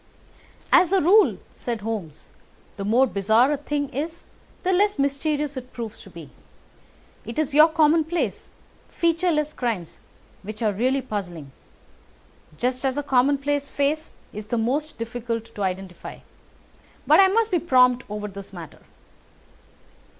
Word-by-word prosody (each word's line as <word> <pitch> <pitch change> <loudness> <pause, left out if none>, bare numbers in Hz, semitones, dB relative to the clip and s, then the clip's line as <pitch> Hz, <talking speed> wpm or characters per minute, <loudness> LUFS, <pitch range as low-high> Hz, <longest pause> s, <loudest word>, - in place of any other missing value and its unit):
"As 355 -1 +5
a 390 - +4
rule," 395 +6 +5 0.2
said 235 -3 -5
Holmes, 200 -9 -6 0.5
"the 200 - -5
more 235 +6 +4
bizarre 220 +4 +2
a 295 - 0
thing 290 0 -2
is 315 +5 -5 0.4
the 375 - +1
less 405 +1 +2
mysterious 285 +1 -1
it 255 0 -8
proves 225 -2 -7
to - - -13
be. 165 -6 -12 0.9
It 230 +2 -8
is 305 -2 -1
your 305 +3 +7
commonplace, 320 +1 +1 0.4
featureless 330 -3 0
crimes 220 -9 -4 0.4
which 215 +3 -7
are 215 - +2
really 255 +6 0
puzzling, 175 - -6 1.1
just 255 - -1
as 265 0 0
a 290 - -1
commonplace 280 +2 +1
face 300 +3 -1 0.2
is 210 0 -7
the 235 - -1
most 285 +7 -1
difficult 230 0 -5
to 205 - -7
identify. 185 -2 -4 0.9
But - - +6
I 390 - +8
must 445 +3 +1
be 355 - +2
prompt 250 -5 +4
over 210 0 -4
this 200 -1 -10
matter." 170 -5 -10
260 Hz, 140 wpm, -24 LUFS, 215-300 Hz, 1.1 s, I